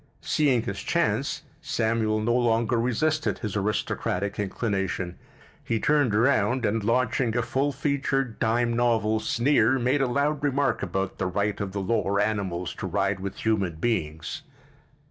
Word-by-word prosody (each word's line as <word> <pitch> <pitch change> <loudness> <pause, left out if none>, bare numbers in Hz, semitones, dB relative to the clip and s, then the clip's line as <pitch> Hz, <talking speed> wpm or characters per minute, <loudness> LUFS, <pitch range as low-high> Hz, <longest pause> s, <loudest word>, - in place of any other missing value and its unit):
Seeing 135 -7 +2
his - - -4
chance, - - 0 0.2
Samuel 110 -1 0
no 120 +2 +1
longer 120 -1 +2
resisted 150 +7 0
his 105 -4 -4
aristocratic 100 -1 -1
inclination. 95 -3 -2 0.5
He 115 - -1
turned 145 -4 +2
around 120 0 +2
and, 110 +1 0
launching 120 +1 +1
a 120 - +1
full 135 +4 0
featured, 135 -3 -1
dime 120 +1 +1
novel 115 -2 +2
sneer, 120 +1 +2
made 130 +3 +1
a 135 - +2
loud 145 +3 0
remark 145 0 +1
about 95 0 -3
the 95 - 0
right 100 +2 -1
of 100 -2 -3
the 100 +1 -3
lower 100 -1 0
animals 95 -5 -1
to - - -3
ride 95 +1 0
with 100 +3 -6
human 100 -7 +1
beings. 80 - -2
115 Hz, 145 wpm, -26 LUFS, 100-125 Hz, 0.5 s, Seeing